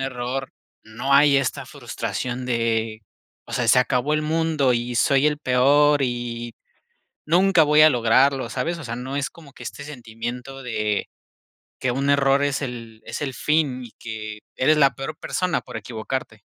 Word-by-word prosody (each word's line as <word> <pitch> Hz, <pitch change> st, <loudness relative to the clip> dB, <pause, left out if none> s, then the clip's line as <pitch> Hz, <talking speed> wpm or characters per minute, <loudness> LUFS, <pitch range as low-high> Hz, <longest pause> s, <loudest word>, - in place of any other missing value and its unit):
error, 130 Hz, 0 st, -4 dB, 0.3 s
no 115 Hz, +5 st, -3 dB
hay 140 Hz, 0 st, +6 dB
esta 135 Hz, -2 st, -1 dB
frustración 125 Hz, 0 st, -5 dB
de: 115 Hz, -2 st, -1 dB, 0.4 s
"O -, -, -12 dB
sea, 120 Hz, -2 st, 0 dB
se 125 Hz, -, +6 dB
acabó 125 Hz, +3 st, +1 dB
el 155 Hz, -, 0 dB
mundo 155 Hz, -4 st, +1 dB
y 120 Hz, 0 st, -2 dB
soy 135 Hz, +4 st, +3 dB
el 150 Hz, -1 st, +1 dB
peor 145 Hz, +2 st, +4 dB
y 120 Hz, -2 st, -3 dB, 0.7 s
nunca 180 Hz, +1 st, +4 dB
voy 150 Hz, +1 st, +5 dB
a 155 Hz, -, +8 dB
lograrlo", 130 Hz, +2 st, +3 dB
¿sabes? 165 Hz, +8 st, -2 dB
O 155 Hz, -, -8 dB
sea, 115 Hz, 0 st, -5 dB
no 130 Hz, +3 st, -5 dB
es 140 Hz, -2 st, -2 dB
como 155 Hz, -4 st, -16 dB
que -, -, -13 dB
este 140 Hz, -, -7 dB
sentimiento 125 Hz, 0 st, -7 dB
de 105 Hz, -4 st, -2 dB, 0.7 s
que 130 Hz, -, 0 dB
un 140 Hz, +3 st, -1 dB
error 140 Hz, 0 st, +3 dB
es 145 Hz, -1 st, 0 dB
el 115 Hz, -4 st, -7 dB
es -, -, -6 dB
el 135 Hz, -2 st, -3 dB
fin 145 Hz, -3 st, 0 dB
y 120 Hz, -, -11 dB
que 110 Hz, -2 st, -7 dB, 0.2 s
eres 155 Hz, +4 st, +3 dB
la 135 Hz, -4 st, +4 dB
peor 135 Hz, +3 st, -5 dB
persona 180 Hz, -2 st, -1 dB
por -, -, -8 dB
equivocarte. 110 Hz, -1 st, -5 dB
130 Hz, 170 wpm, -23 LUFS, 120-145 Hz, 0.7 s, a